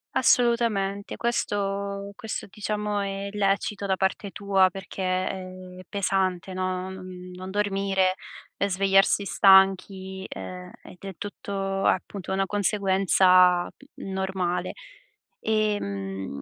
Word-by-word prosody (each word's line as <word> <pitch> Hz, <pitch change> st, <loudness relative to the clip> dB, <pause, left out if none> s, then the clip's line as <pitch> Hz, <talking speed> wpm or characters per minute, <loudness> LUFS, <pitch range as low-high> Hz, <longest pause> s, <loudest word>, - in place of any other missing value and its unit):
Assolutamente, 225 Hz, -5 st, +2 dB
questo 200 Hz, -3 st, -2 dB
questo, 220 Hz, -3 st, -5 dB
diciamo, 210 Hz, 0 st, -2 dB
è 195 Hz, 0 st, -3 dB
lecito 200 Hz, 0 st, 0 dB
da 190 Hz, -1 st, +1 dB
parte 190 Hz, +1 st, -1 dB
tua, 195 Hz, -2 st, +3 dB
perché 190 Hz, 0 st, -7 dB
è 185 Hz, 0 st, -1 dB, 0.4 s
pesante, 190 Hz, -2 st, -1 dB
no, 185 Hz, 0 st, -2 dB
non 185 Hz, -1 st, -9 dB
non 185 Hz, +1 st, -7 dB
dormire 195 Hz, -2 st, +1 dB, 0.4 s
e 200 Hz, -, 0 dB
svegliarsi 195 Hz, +1 st, +3 dB
stanchi, 190 Hz, -1 st, +4 dB
ehm, 180 Hz, 0 st, -8 dB
ed -, -, -13 dB
è 195 Hz, -1 st, -6 dB
tutto, 195 Hz, -1 st, -4 dB
appunto, 190 Hz, 0 st, -1 dB
una 195 Hz, 0 st, 0 dB
conseguenza, 190 Hz, -3 st, +4 dB
mhmm, 195 Hz, -, -11 dB
normale. 190 Hz, -2 st, -2 dB, 0.7 s
Ehm, 100 Hz, -, -2 dB
195 Hz, 105 wpm, -26 LUFS, 185-200 Hz, 0.7 s, stanchi